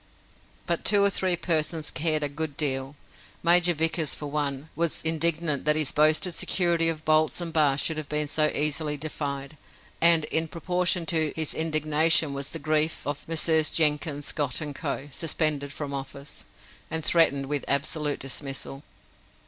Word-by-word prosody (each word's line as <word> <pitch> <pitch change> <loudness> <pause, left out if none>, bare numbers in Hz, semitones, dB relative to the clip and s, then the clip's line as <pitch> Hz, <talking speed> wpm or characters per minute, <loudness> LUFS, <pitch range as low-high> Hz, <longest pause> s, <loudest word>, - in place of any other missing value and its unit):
But 170 -1 -1
two 205 -1 +5
or 200 - +4
three 185 -2 +2
persons 160 -2 -1
cared 155 +2 +1
a - - +2
good 145 0 -5
deal. 135 -1 -1 0.5
Major 175 0 +4
Vickers, 160 0 +1
for 150 - -7
one, 145 0 -3
was 170 -1 -1
indignant 160 -2 +2
that 150 0 +4
his 155 -3 +2
boasted 155 +4 +2
security 170 -1 +1
of 155 -1 -5
bolts 155 +1 +2
and 170 -2 -4
bars 145 -3 +3
should 160 - -1
have 155 -2 -5
been 150 0 -1
so 150 +1 +2
easily 150 0 -1
defied, 140 -1 -5 0.4
and 165 -2 +5
in 160 0 +1
proportion 180 +1 -1
to 160 -2 0
his 160 -2 -1
indignation 155 -1 +2
was 140 0 -3
the - - -4
grief 155 +1 0
of 145 0 -5
Messieurs 160 -1 +3
Jenkins, 150 -2 +1
Scott, 145 -5 -1
and 150 -2 -4
Co., 140 -1 -4
suspended 150 -2 -1
from 145 -1 -6
office, 140 +1 -6 0.4
and 160 -1 -3
threatened 150 -5 +3
with 145 0 -3
absolute 150 +1 -1
dismissal. 135 0 -5
155 Hz, 160 wpm, -26 LUFS, 145-165 Hz, 0.5 s, two